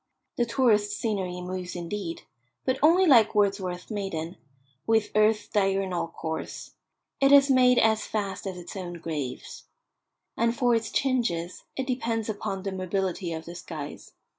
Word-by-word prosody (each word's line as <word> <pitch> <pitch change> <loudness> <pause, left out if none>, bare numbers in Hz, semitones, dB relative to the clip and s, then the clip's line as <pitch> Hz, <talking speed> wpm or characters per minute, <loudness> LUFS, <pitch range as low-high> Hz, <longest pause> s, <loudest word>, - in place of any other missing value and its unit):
The 240 - +1
tourist's 215 -4 +2
scenery 190 -6 -2
moves 180 0 -5
indeed, 175 0 -5 0.4
but 260 0 0
only 340 +5 +6
like 235 - +6
Wordsworth's 195 -2 0
maiden, 185 -5 -4 0.5
with 220 -1 +2
earth's 215 0 +3
diurnal 195 -4 0
course; 160 -1 -6 0.5
it 275 0 +4
is 280 -1 +7
made 250 -1 +5
as 220 -1 +3
fast 200 -2 -3
as 185 -2 -5
its 175 +2 -9
own 180 -2 -5
graves. 155 -6 -5 0.7
And 230 +1 +1
for 245 -3 +3
its 225 -2 0
changes 230 -12 -1
it 265 - -2
depends 230 -4 -2
upon 205 -2 -3
the 195 - -2
mobility 185 -1 -2
of 160 0 -5
the 170 - -8
skies. 160 -4 -8
200 Hz, 145 wpm, -27 LUFS, 180-230 Hz, 0.7 s, is